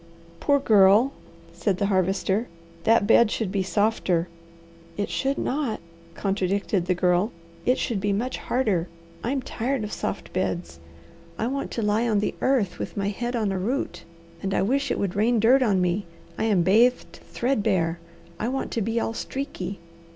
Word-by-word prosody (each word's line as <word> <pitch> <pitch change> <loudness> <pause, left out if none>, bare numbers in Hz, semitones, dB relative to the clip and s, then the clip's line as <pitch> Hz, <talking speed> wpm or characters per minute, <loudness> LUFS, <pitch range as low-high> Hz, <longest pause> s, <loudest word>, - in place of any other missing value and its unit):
"Poor 285 -1 +3
girl," 215 +1 +5 0.4
said 195 -4 0
the 200 - 0
Harvester. 195 +3 +1 0.4
"That 225 -2 +4
bed 235 +2 +5
should 215 -3 -2
be 200 -1 0
softer." 190 -2 +1 0.7
"It 205 - -2
should 275 +1 0
not!" 265 -6 -1 0.4
contradicted 195 -1 0
the 180 - +2
Girl. 180 +3 +2 0.4
"It 250 - +4
should 230 -5 -1
be 205 +1 0
much 235 +6 -1
harder. 210 -9 0 0.4
I'm 260 +3 -1
tired 250 +1 -2
of 210 - -5
soft - - -4
beds. 175 - -2 0.6
I 220 - -1
want 275 +3 -2
to 230 - -2
lie 215 +3 +2
on 215 - +2
the 205 - 0
earth, 250 -9 +1
with - - -5
my 200 0 0
head 240 +4 -3
on 215 -4 0
a 190 - -1
root; 245 +10 -2 0.4
and 195 0 -1
I - - +2
wish 275 +7 +1
it - - 0
would 195 -3 -2
rain 225 +3 +3
dirt 250 +5 +5
on 205 -7 +3
me. 180 +1 0 0.3
I 220 - -1
am 200 -6 +3
bathed 230 +7 +3
threadbare. 200 -9 0 0.4
I 220 - -1
want 265 +2 -2
to 230 - -1
be 225 +3 0
all 225 - -2
streaky." 215 -8 -5
210 Hz, 175 wpm, -25 LUFS, 190-240 Hz, 0.7 s, girl